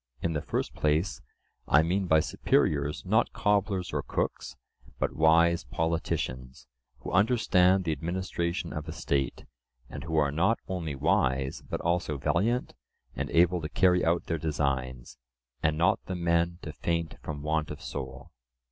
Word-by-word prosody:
In 85 +4 -1
the 75 - -1
first - - -3
place, 80 +4 0 0.5
I 75 +2 +5
mean 95 +3 0
by 80 -2 +5
superiors 75 0 0
not 110 +5 +2
cobblers 100 -3 0
or - - 0
cooks, 60 - -3 0.4
but - - -1
wise 85 +1 +4
politicians 65 -5 -3 0.4
who - - -6
understand 95 -2 +4
the 80 - -1
administration 85 +2 -3
of 75 +1 -5
a - - -5
state, 70 -6 -2 0.5
and - - -6
who 80 -1 -2
are 75 -2 +3
not 90 +10 +2
only 85 -6 -3
wise, 65 0 +1
but - - -3
also 85 -3 0
valiant 105 - 0 0.4
and - - -3
able 90 +1 +3
to 75 - -4
carry 90 0 +3
out 85 +1 +2
their 80 -1 -2
designs, 65 -5 -2 0.4
and 80 -1 +1
not 95 +5 +2
the 95 - -3
men 85 0 +1
to 75 - -6
faint 85 0 -2
from 75 -2 -6
want 75 0 0
of - - -7
soul. 65 -1 -7
80 Hz, 155 wpm, -28 LUFS, 75-90 Hz, 0.5 s, I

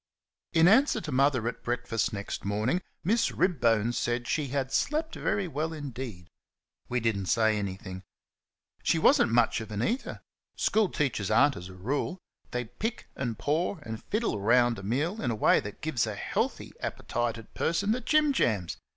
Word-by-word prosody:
In 165 +1 +6
answer 260 +9 +5
to 155 - -6
Mother 130 -3 +2
at - - -4
breakfast, 120 -1 -1
next 100 -2 -5
morning, 110 - 0 0.2
Miss 225 +6 +2
Ribbone 120 - +2
said 120 0 -1
she 150 -2 0
had 135 0 -2
"slept 315 +2 0
very 200 -2 -1
well 160 +1 -2
indeed." 125 - -6 0.6
We 125 - +1
did 115 -2 +1
n't 95 -2 -4
say 110 -1 +3
anything. 95 -2 -5 0.8
She - - +2
was - - +5
n't - - +2
much 115 -1 +3
of 110 - -8
an 105 +1 -2
eater. 250 - -2 0.3
School 215 -3 +2
teachers 120 - -1
are 115 +7 +5
n't 140 - -6
as 90 +1 -8
a 95 - -11
rule. 140 - -2 0.3
They 125 0 -2
pick, 215 - -5
and 120 -5 -3
paw, 160 - 0
and 110 -2 -6
fiddle 215 - -1
round 120 +1 +4
a - - -9
meal 150 - -1
in 120 - 0
a 115 - 0
way 105 - +4
that 105 - -8
gives 155 -8 0
a - - -3
healthy - - -2
appetited 115 -1 -3
person 185 +6 0
the 250 +3 0
jim 305 0 +3
jams. 100 - 0
125 Hz, 180 wpm, -29 LUFS, 110-165 Hz, 0.8 s, In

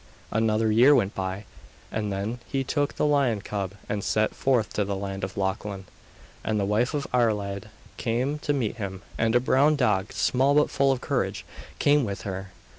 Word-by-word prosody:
Another 110 0 +2
year 125 +7 +7
went 105 -5 +1
by, 95 +2 -4 0.5
and 105 -2 -2
then 100 +5 -3
he 135 -1 -1
took 145 +2 -1
the - - +1
lion 140 -7 +2
cub 100 -2 -4
and 105 -1 -2
set 110 0 +1
forth 125 -5 +1
to 105 - +1
the 100 0 -2
land 95 0 -5
of 95 +1 -4
Lochlann. 95 0 -2 0.6
And 110 -1 0
the 100 - +1
wife 115 +8 +1
of 145 - -1
Iarlaid 105 -4 0 0.3
came 130 +5 -1
to 145 - -1
meet 125 -5 -1
him, 100 -3 -5 0.2
and 115 +1 +2
a - - +7
brown 140 +4 +3
dog, 105 -8 +1
small 135 +3 +2
but 150 - +3
full 140 0 +3
of 130 - -1
courage, - - -1 0.3
came 145 0 +4
with 100 -4 -4
her. 95 0 -5
110 Hz, 190 wpm, -26 LUFS, 100-130 Hz, 0.6 s, year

